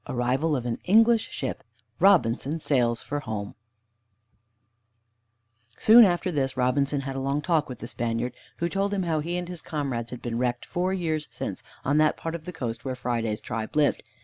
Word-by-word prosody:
VII - - -4
ARRIVAL 130 +6 +1
OF 125 -3 -3
AN 115 -1 -2
ENGLISH 225 +3 +5
SHIP; 130 - -4 0.4
ROBINSON 160 - +3
SAILS 120 -6 +1
FOR 145 - -3
HOME 105 -6 -5 2.2
Soon 230 +1 +8
after 180 0 +1
this 135 -4 -1
Robinson 140 +3 +1
had 135 0 -5
a - - -2
long 140 +2 0
talk 160 -2 +1
with 125 - -6
the 115 - -7
Spaniard, 120 +1 -2 0.2
who 170 - 0
told 200 +2 -1
him 190 - 0
how 165 -3 0
he 170 +4 -2
and 175 -1 -4
his 175 -3 -6
comrades 135 -7 -3
had 125 - -8
been 120 -1 -2
wrecked 125 -1 -1
four 180 +2 -1
years 160 -5 -1
since, - - -5 0.2
on 140 +3 +2
that 155 0 +3
part 165 - -4
of 165 -2 -6
the 180 - -5
coast 120 -7 -4
where 130 -1 -3
Friday's 115 -3 -2
tribe 110 0 -5
lived. 150 -2 +3
140 Hz, 190 wpm, -26 LUFS, 120-170 Hz, 2.2 s, Soon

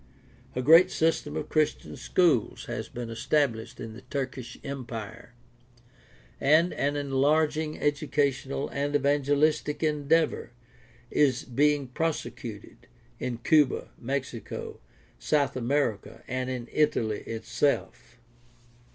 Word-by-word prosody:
A 125 - -1
great 165 +6 +8
system 160 -3 0
of 155 - -4
Christian 155 -1 0
schools 165 - +1
has - - -5
been 120 -1 -6
established 115 -1 0
in 115 -3 -6
the 115 - -11
Turkish 130 -3 -5
empire, 120 -4 -7 1.0
and 155 +5 +4
an 145 +1 0
enlarging 150 +3 +1
educational 145 -2 0
and 145 +1 -2
evangelistic 145 +2 +2
endeavor 150 -4 +1 0.6
is 135 -2 +2
being 145 +2 +2
prosecuted 120 -7 -4 0.3
in 120 -2 -3
Cuba, 150 -3 +3
Mexico, 130 -2 -5 0.4
South 145 - +1
America, 130 -3 -1
and 130 0 -2
in 125 -2 -4
Italy 115 -8 +1
itself. 120 +1 -2
140 Hz, 100 wpm, -28 LUFS, 120-150 Hz, 1.0 s, great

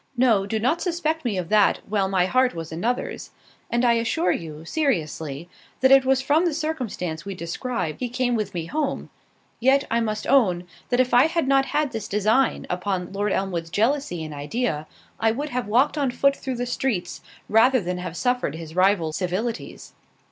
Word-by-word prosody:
No; 225 -6 +3
do 220 - -1
not 260 +10 +1
suspect 325 -3 -1
me 225 -6 -1
of 180 -2 -3
that, 210 -2 +4
while 195 -2 0
my 185 -2 +2
heart 255 +2 +2
was 165 -1 -6
another's: 225 +10 -3 0.4
and 240 +1 +1
I 235 - +5
assure 235 +9 +1
you, 160 -1 -5
seriously, 165 - -2 0.3
that 260 0 +5
it 270 -1 +7
was 265 0 +2
from 300 +5 +3
the 330 -4 0
circumstance 240 - -3
we 195 +1 -6
described 175 - -4
he 250 - -2
came 250 0 0
with 210 -5 -2
me 165 -2 -2
home—yet, 275 - -2
I 230 - +2
must 215 -2 -2
own, 200 -10 +3 0.3
that 245 - +1
if 255 0 +2
I 245 +5 +6
had 330 -4 -1
not 270 0 +3
had 300 -3 0
this 220 -2 -5
design 215 +6 +1
upon 180 0 -3
Lord 205 +1 -1
Elmwood's 175 -4 -2
jealousy 220 - 0
in 155 -1 -7
idea, 150 - -2 0.3
I 225 - +3
would 285 +7 -2
have 250 -4 -3
walked 260 +8 +2
on 275 -2 +1
foot 275 +3 +2
through 265 -2 -4
the 245 - -2
streets, 240 -7 -2 0.3
rather 250 +5 +5
than 180 -2 -3
have 180 -1 -6
suffered 250 - 0
his 160 0 -9
rival's 185 -4 +2
civilities. 200 +6 -4
225 Hz, 185 wpm, -24 LUFS, 180-260 Hz, 0.4 s, it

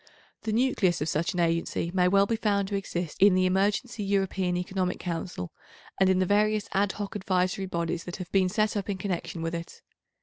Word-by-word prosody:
The 220 - -3
nucleus 220 -6 +2
of 155 - 0
such 170 +5 -1
an - - -1
agency 170 0 0
may 180 -1 +3
well 195 +2 +4
be 230 - 0
found 200 -3 +1
to 205 - -2
exist 175 -5 -4
in 200 -1 +7
the 185 0 +3
Emergency 205 +5 0
European 190 -2 0
Economic 180 0 -1
Council 165 - -4 0.5
and 190 -1 +5
in 190 - +3
the 185 - +2
various 210 +2 +2
ad 195 0 +2
hoc 205 -1 -5
advisory 185 -1 0
bodies 170 -1 -2
that 175 - -5
have 185 -2 -8
been 190 -2 +3
set 215 +3 +1
up 205 -1 -3
in 195 - -1
connection 180 -3 -3
with 165 0 -2
it. 170 0 -7
190 Hz, 205 wpm, -27 LUFS, 175-200 Hz, 0.5 s, in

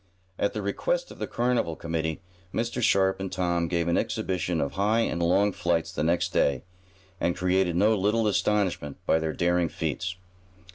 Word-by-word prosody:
At 100 - +1
the 105 - -3
request - - -1
of - - -12
the - - -3
carnival 120 -9 0
committee, 80 0 -3 0.3
Mr. 120 +1 -2
Sharp 95 -3 +3
and 95 -1 -4
Tom 85 -2 0
gave 85 -1 0
an 85 - +2
exhibition 90 -2 -1
of 70 - -1
high 105 +4 +2
and 85 -6 -1
long 95 +4 +3
flights 85 -2 -1
the 90 - -2
next 85 +2 +1
day, 70 -3 +2 0.6
and 85 - 0
created 90 -1 +1
no 105 +5 +4
little 105 +3 +1
astonishment 100 -8 0
by 80 - +3
their 80 -1 -2
daring 85 -1 +1
feats. 80 +4 -3
90 Hz, 175 wpm, -27 LUFS, 85-100 Hz, 0.6 s, no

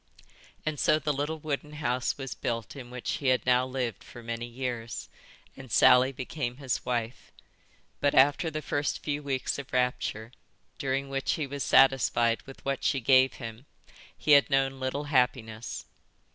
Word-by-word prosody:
And 155 -2 -2
so 155 - +4
the 150 0 -1
little 145 +3 -2
wooden 150 -1 -4
house 125 -4 -1
was 135 -2 -5
built 115 0 -4
in 125 -3 -9
which 125 0 -8
he 140 - -3
had 130 -3 +2
now 125 0 +3
lived 125 -3 -3
for 120 - -12
many 115 +1 -4
years, 120 -2 -5 0.5
and 130 -3 -11
Sally 125 +4 +6
became 130 -1 -4
his 135 -3 -2
wife. 120 -1 -3 0.7
But 145 - +2
after 145 +5 +4
the 155 0 -5
first 145 +1 -2
few 145 0 -2
weeks 140 -1 -2
of 140 - -8
rapture, 125 -3 -1 0.5
during 135 0 -1
which 135 0 -1
he 155 - -2
was 140 +1 -6
satisfied 120 -3 +4
with 135 - -12
what 135 -1 -2
she 135 - +2
gave 130 +1 +5
him 115 +2 -9 0.5
he 150 - 0
had 140 -1 +7
known 135 0 +1
little 130 +2 -2
happiness. 125 -5 -1
130 Hz, 165 wpm, -28 LUFS, 125-140 Hz, 0.7 s, had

